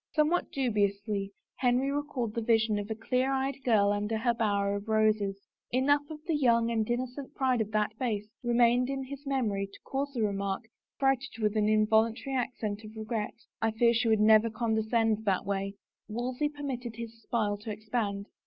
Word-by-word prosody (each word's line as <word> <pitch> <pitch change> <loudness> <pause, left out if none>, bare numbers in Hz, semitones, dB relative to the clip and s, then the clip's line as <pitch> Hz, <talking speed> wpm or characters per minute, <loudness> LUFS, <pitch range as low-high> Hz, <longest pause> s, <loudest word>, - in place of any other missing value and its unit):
Somewhat 310 +3 +2
dubiously 205 -5 0 0.3
Henry 255 +2 +2
recalled 280 -6 -2
the 230 - -2
vision 220 -2 +2
of 205 +1 -5
a 220 - -2
clear 250 +4 0
eyed 270 0 -1
girl 205 -4 +4
under 210 +2 -1
her 235 +2 +2
bower 200 -3 +1
of 200 +2 -5
roses. 215 -2 +2 0.3
Enough 285 +3 +2
of 305 -1 -9
the 325 - 0
young 235 -4 +3
and 220 -1 0
innocent 255 +3 -3
pride 255 -3 +2
of 215 - -2
that 215 0 0
face 210 -5 -1
remained 240 +1 +3
in 270 -1 -2
his 280 +2 -9
memory 215 -8 0
to - - -14
cause 280 +1 -2
the 230 - +1
remark, 200 +1 -1 0.3
freighted 270 -2 0
with 210 -1 +1
an 210 -1 +2
in 215 0 +4
voluntary 225 +5 +1
accent 225 -4 -2
of 215 +1 -11
regret, 220 -1 -3 0.2
" - - -61
I 225 - +3
fear 235 +2 +3
she 235 +1 +1
would 220 -1 +4
never 215 +1 +6
condescend 220 -1 +1
that 195 -1 +1
way." 195 0 -2 0.3
Wolsey 250 +6 -2
permitted 260 -6 -5
his 230 0 -8
smile 210 -4 0
to 220 +2 -8
expand. 210 -1 -2
225 Hz, 185 wpm, -30 LUFS, 210-255 Hz, 0.3 s, never